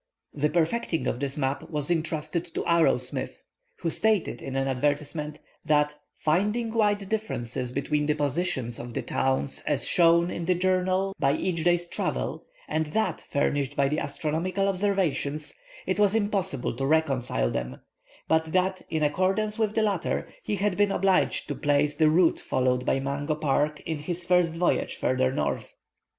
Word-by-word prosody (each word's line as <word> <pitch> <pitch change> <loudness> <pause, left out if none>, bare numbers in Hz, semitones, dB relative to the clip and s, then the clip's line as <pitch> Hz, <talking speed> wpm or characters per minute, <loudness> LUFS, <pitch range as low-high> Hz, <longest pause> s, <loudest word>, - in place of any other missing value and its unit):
The 150 +1 +1
perfecting 170 +2 0
of 120 - -1
this 140 0 -2
map 135 -1 -2
was 150 0 -1
entrusted 160 0 -1
to - - -1
Arrowsmith, 170 -1 +1 0.4
who 165 - 0
stated 215 -1 +1
in 135 - -5
an 135 0 0
advertisement, 145 +3 -1 0.3
that, 150 -1 +2 0.2
finding 210 +8 0
wide 205 -3 +1
differences 130 - -3
between 150 +2 -1
the 150 - +2
positions 145 -5 -1
of 120 -1 -7
the - - -2
towns 135 +1 0
as - - +1
shown 170 0 +4
in 170 - -4
the 180 +1 +2
journal 185 +1 +1
by 140 0 +3
each 165 +1 -1
day's 175 0 +3
travel - - -2 0.2
and 160 0 -1
that 185 +1 -1
furnished 140 0 0
by 140 - +3
the 150 +2 0
astronomical 165 +7 -1
observations, 185 -7 0 0.3
it 185 +2 -1
was 205 0 +4
impossible 195 - 0
to 135 - -1
reconcile 135 - +1
them; 60 +1 -4 0.5
but 160 0 +3
that, 185 +1 +1
in 160 -1 0
accordance 195 +8 +1
with 215 -1 0
the 220 - +3
latter, 200 -5 -1
he 210 - -2
had 200 -1 0
been 205 -1 +3
obliged 190 -1 +2
to - - -2
place 145 0 +1
the 155 -1 +4
route 165 +2 +3
followed 125 0 0
by 135 - +2
Mungo 140 +3 -2
Park 150 0 0
in 160 -2 -4
his 175 +3 -4
first 175 -2 +3
voyage 175 +1 0
farther 130 0 +1
north. - - -2
160 Hz, 165 wpm, -27 LUFS, 145-185 Hz, 0.5 s, shown